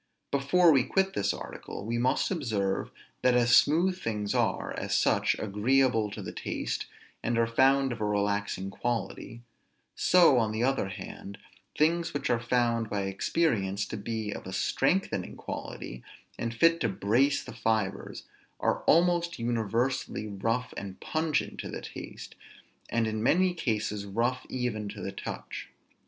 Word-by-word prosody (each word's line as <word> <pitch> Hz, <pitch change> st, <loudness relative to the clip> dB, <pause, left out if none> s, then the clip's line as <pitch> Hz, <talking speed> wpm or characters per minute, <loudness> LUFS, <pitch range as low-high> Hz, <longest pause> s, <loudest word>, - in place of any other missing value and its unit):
Before 160 Hz, +5 st, +4 dB
we 135 Hz, -4 st, +5 dB
quit 190 Hz, +7 st, +1 dB
this 100 Hz, 0 st, +1 dB
article, 100 Hz, -, -7 dB
we 115 Hz, +1 st, -1 dB
must 130 Hz, +8 st, +1 dB
observe, 110 Hz, -, -1 dB, 0.3 s
that 125 Hz, -1 st, +4 dB
as 120 Hz, 0 st, +5 dB
smooth 180 Hz, +5 st, +4 dB
things 105 Hz, -2 st, -2 dB
are, -, -, 0 dB
as -, -, -2 dB
such, -, -, +2 dB
agreeable 110 Hz, +2 st, +2 dB
to 105 Hz, 0 st, -7 dB
the 85 Hz, -, -5 dB
taste, -, -, -3 dB, 0.3 s
and 120 Hz, 0 st, 0 dB
are 115 Hz, -, +4 dB
found 135 Hz, +3 st, +3 dB
of 115 Hz, -2 st, -5 dB
a -, -, +1 dB
relaxing 100 Hz, -2 st, -1 dB
quality; 115 Hz, +1 st, -4 dB, 0.5 s
so 170 Hz, -8 st, +5 dB
on 110 Hz, -2 st, 0 dB
the 110 Hz, +2 st, -1 dB
other 130 Hz, -6 st, +1 dB
hand, 100 Hz, +1 st, -8 dB, 0.4 s
things 165 Hz, +2 st, +2 dB
which 145 Hz, -, 0 dB
are 120 Hz, -, +2 dB
found 115 Hz, -1 st, +1 dB
by 100 Hz, -1 st, -1 dB
experience 100 Hz, -, 0 dB
to -, -, -6 dB
be 110 Hz, 0 st, -3 dB
of -, -, -7 dB
a 95 Hz, -, -6 dB
strengthening 135 Hz, -, 0 dB
quality, -, -, -7 dB, 0.3 s
and 115 Hz, 0 st, -3 dB
fit 165 Hz, +7 st, +4 dB
to -, -, +2 dB
brace 120 Hz, +9 st, +2 dB
the -, -, -9 dB
fibres, 110 Hz, -3 st, -1 dB, 0.4 s
are -, -, +1 dB
almost 170 Hz, 0 st, +3 dB
universally 115 Hz, +1 st, -1 dB
rough 115 Hz, +5 st, -2 dB
and 95 Hz, -2 st, -7 dB
pungent 155 Hz, -1 st, -1 dB
to -, -, -5 dB
the -, -, -5 dB
taste, -, -, -8 dB, 0.6 s
and 115 Hz, -1 st, +1 dB
in 110 Hz, -1 st, -2 dB
many 180 Hz, +9 st, +3 dB
cases 105 Hz, -, -2 dB
rough 120 Hz, +5 st, -1 dB
even 115 Hz, -5 st, -2 dB
to 100 Hz, 0 st, -8 dB
the 100 Hz, -, -4 dB
touch. 100 Hz, -, -6 dB
115 Hz, 155 wpm, -29 LUFS, 105-135 Hz, 0.6 s, we